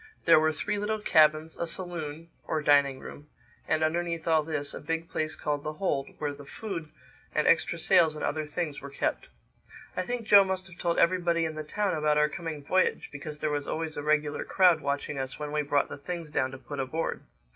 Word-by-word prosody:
There 165 Hz, -2 st, +7 dB
were 155 Hz, 0 st, +3 dB
three 205 Hz, +6 st, -2 dB
little 215 Hz, +1 st, -1 dB
cabins, 155 Hz, -5 st, +3 dB
a 170 Hz, -, -2 dB
saloon 165 Hz, -2 st, -5 dB, 0.2 s
(or 155 Hz, -1 st, -1 dB
dining 140 Hz, -2 st, +4 dB
room) 145 Hz, +2 st, -11 dB, 0.4 s
and 155 Hz, 0 st, +1 dB
underneath 170 Hz, +1 st, -1 dB
all 160 Hz, -1 st, +4 dB
this, 150 Hz, -2 st, -2 dB
a -, -, -6 dB
big 165 Hz, 0 st, -3 dB
place 155 Hz, 0 st, -2 dB
called 145 Hz, -1 st, -2 dB
the 155 Hz, -, -3 dB
hold 145 Hz, -5 st, -1 dB
where 145 Hz, -1 st, -2 dB
the 145 Hz, 0 st, -11 dB
food 170 Hz, 0 st, -6 dB, 0.5 s
and -, -, +2 dB
extra -, -, +3 dB
sails 160 Hz, -2 st, +4 dB
and 150 Hz, -, -3 dB
other 155 Hz, +1 st, -2 dB
things 150 Hz, -1 st, -3 dB
were 140 Hz, -, -7 dB
kept. 140 Hz, -, -2 dB, 0.7 s
I -, -, 0 dB
think 240 Hz, +4 st, -3 dB
Joe 205 Hz, -2 st, +8 dB
must 190 Hz, -1 st, -2 dB
have 180 Hz, -2 st, -14 dB
told 170 Hz, -1 st, 0 dB
everybody 170 Hz, -1 st, +3 dB
in 160 Hz, -, -3 dB
the 155 Hz, 0 st, -5 dB
town 200 Hz, +5 st, -1 dB
about 150 Hz, -1 st, +2 dB
our 150 Hz, 0 st, +4 dB
coming 160 Hz, -3 st, -6 dB
voyage, 185 Hz, +6 st, +1 dB
because 150 Hz, +1 st, -7 dB
there 155 Hz, -, 0 dB
was 145 Hz, -1 st, -2 dB
always 160 Hz, -1 st, -3 dB
a -, -, -3 dB
regular 150 Hz, 0 st, +1 dB
crowd 180 Hz, -4 st, +4 dB
watching 140 Hz, 0 st, -2 dB
us 130 Hz, 0 st, -4 dB
when 150 Hz, -1 st, -5 dB
we 150 Hz, 0 st, +1 dB
brought 145 Hz, -1 st, +1 dB
the -, -, -8 dB
things 170 Hz, 0 st, -5 dB
down 130 Hz, -3 st, +1 dB
to 135 Hz, -, -8 dB
put 140 Hz, +1 st, -8 dB
aboard. 135 Hz, +5 st, -2 dB
155 Hz, 215 wpm, -28 LUFS, 145-170 Hz, 0.7 s, Joe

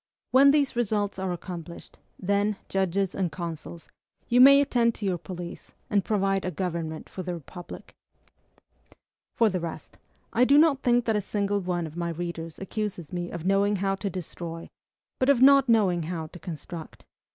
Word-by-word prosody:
when 275 Hz, +2 st, +7 dB
these 280 Hz, -3 st, +2 dB
results 205 Hz, -4 st, -1 dB
are 190 Hz, -1 st, -2 dB
accomplished, 175 Hz, -1 st, -8 dB, 0.2 s
then, 200 Hz, +2 st, 0 dB
judges 195 Hz, 0 st, 0 dB
and 185 Hz, -4 st, -1 dB
consuls, 170 Hz, 0 st, -7 dB, 0.4 s
you 245 Hz, +1 st, +4 dB
may 275 Hz, +2 st, +9 dB
attend 240 Hz, -4 st, +2 dB
to 210 Hz, -, -5 dB
your 180 Hz, -3 st, 0 dB
police, 175 Hz, -1 st, -8 dB, 0.2 s
and 200 Hz, -2 st, +3 dB
provide 195 Hz, -2 st, 0 dB
a -, -, -1 dB
government 165 Hz, -2 st, -4 dB
for 185 Hz, -, -7 dB
the 180 Hz, -1 st, -4 dB
Republic! 175 Hz, +2 st, -10 dB, 1.4 s
For 230 Hz, -, +4 dB
the 185 Hz, -3 st, -1 dB
rest, 165 Hz, -2 st, -7 dB, 0.3 s
I 235 Hz, +2 st, +4 dB
do 280 Hz, +3 st, +5 dB
not 300 Hz, -3 st, +4 dB
think 245 Hz, -1 st, +2 dB
that 225 Hz, -, +1 dB
a 210 Hz, -, +1 dB
single 205 Hz, 0 st, -1 dB
one 175 Hz, -2 st, -2 dB
of 155 Hz, 0 st, -9 dB
my 170 Hz, -1 st, -2 dB
readers 165 Hz, -1 st, -5 dB
accuses 195 Hz, -5 st, -5 dB
me 175 Hz, -1 st, -3 dB
of 170 Hz, -1 st, -7 dB
knowing 200 Hz, +2 st, +3 dB
how 195 Hz, 0 st, 0 dB
to 200 Hz, +1 st, -3 dB
destroy, 170 Hz, -2 st, -7 dB, 0.5 s
but 260 Hz, -, +2 dB
of 280 Hz, -4 st, +5 dB
not 275 Hz, 0 st, +6 dB
knowing 195 Hz, -7 st, +3 dB
how 165 Hz, 0 st, -4 dB
to 165 Hz, +3 st, -12 dB
construct. 165 Hz, -1 st, -8 dB
190 Hz, 175 wpm, -26 LUFS, 170-220 Hz, 1.4 s, may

